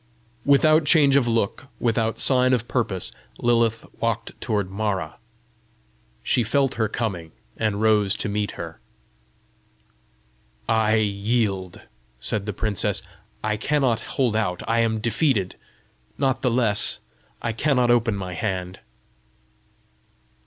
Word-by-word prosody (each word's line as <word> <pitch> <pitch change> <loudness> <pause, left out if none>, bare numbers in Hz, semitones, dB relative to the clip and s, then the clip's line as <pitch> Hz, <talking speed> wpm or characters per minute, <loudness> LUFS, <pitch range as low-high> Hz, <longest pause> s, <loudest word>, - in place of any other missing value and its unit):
Without 155 +3 +5
change 145 -2 +5
of 135 -4 +3
look, 115 +2 -1
without 115 -1 0
sign 130 0 +4
of 120 -1 0
purpose, 105 -7 -1 0.3
Lilith 115 -2 +1
walked 115 0 -1
toward 100 -5 -1
Mara. 100 -1 -3 1.0
She 125 - +2
felt 135 +4 +1
her 110 -1 0
coming, 95 -8 -4 0.2
and 110 -2 -1
rose 105 -3 +3
to - - -2
meet 105 0 -2
her. 80 -1 -8 1.9
"I 110 -1 +3
yield," 100 -2 -1 0.4
said 100 - -2
the - - -1
princess. 105 -1 -1 0.4
"I 110 0 0
cannot 130 -2 +1 0.2
hold 125 -5 +2
out. 105 -5 -1
I 115 +1 +2
am 115 -1 +1
defeated. 115 - 0 0.6
Not 135 -1 0
the 125 - +2
less, 115 -4 +2 0.4
I 115 - -2
cannot 125 0 +2
open 115 -2 +2
my 95 -2 -5
hand." 95 -1 -3
110 Hz, 120 wpm, -23 LUFS, 100-120 Hz, 1.9 s, Without